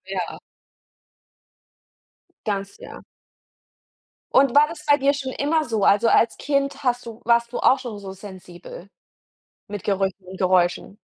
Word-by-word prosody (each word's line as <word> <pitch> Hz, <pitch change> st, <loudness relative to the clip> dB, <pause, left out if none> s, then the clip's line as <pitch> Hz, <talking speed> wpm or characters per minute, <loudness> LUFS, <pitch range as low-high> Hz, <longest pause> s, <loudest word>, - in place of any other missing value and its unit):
Ja. 185 Hz, -3 st, -4 dB, 2.1 s
Ganz, 200 Hz, -2 st, -3 dB
ja. -, -, -11 dB, 1.3 s
Und 265 Hz, -2 st, +4 dB
war 290 Hz, +1 st, +6 dB
das 330 Hz, -, -10 dB
bei 290 Hz, 0 st, +5 dB
dir 280 Hz, +1 st, +2 dB
schon 265 Hz, -2 st, -5 dB
immer 305 Hz, +3 st, 0 dB
so? 220 Hz, -4 st, -1 dB
Also, 210 Hz, +3 st, +4 dB
als 230 Hz, 0 st, +3 dB
Kind 280 Hz, -1 st, -1 dB
hast 245 Hz, -1 st, 0 dB
du 230 Hz, 0 st, -9 dB
warst 235 Hz, 0 st, +2 dB
du -, -, -3 dB
auch 265 Hz, -, +4 dB
schon 235 Hz, -5 st, -7 dB
so 195 Hz, -1 st, -8 dB
sensibel 185 Hz, -1 st, -12 dB, 0.8 s
mit 205 Hz, -3 st, -7 dB
Gerüchen 195 Hz, -1 st, -2 dB
und 185 Hz, +1 st, -10 dB
Geräuschen? 185 Hz, +1 st, +1 dB
225 Hz, 140 wpm, -22 LUFS, 195-275 Hz, 2.1 s, war